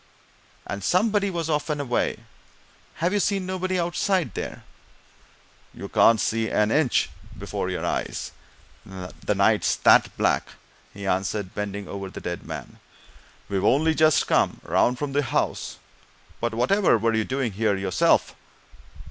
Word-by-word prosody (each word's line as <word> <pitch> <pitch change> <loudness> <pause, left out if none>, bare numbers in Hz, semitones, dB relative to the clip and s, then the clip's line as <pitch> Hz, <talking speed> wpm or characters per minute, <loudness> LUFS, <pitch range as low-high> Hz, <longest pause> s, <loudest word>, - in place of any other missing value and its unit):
And 100 -1 -5
somebody 200 - +2
was 170 -3 -3
off 150 0 -1
and 150 -1 -1
away 125 -4 -1 0.7
have 175 +4 0
you 205 - +2
seen 195 -1 0
nobody 185 0 -2
outside 175 +1 0
there?" - - -6 1.1
"You - - -7
can't 115 -1 +5
see 110 +1 0
an 105 +1 +2
inch 145 -3 +2 0.3
before - - -4
your - - -3
eyes - - -3 0.5
the 95 -2 -5
night's - - +3
that - - +4
black," - - +1 0.4
he 100 0 -8
answered, 95 +1 -1
bending 100 -1 -4
over 100 -1 -6
the - - -8
dead 85 0 -5
man. - - -8 0.7
"We've 100 -1 -1
only 155 +8 +3
just 155 -1 +4
come - - +1
round 125 +1 +2
from 140 +1 -4
the 145 - +2
house. 125 - -2 0.6
But 120 -1 -2
whatever 185 - +3
were 115 +1 +1
you 110 0 +1
doing 130 -1 -2
here, 105 +1 +1
yourself?" 95 -2 +2
125 Hz, 145 wpm, -24 LUFS, 100-170 Hz, 1.1 s, can't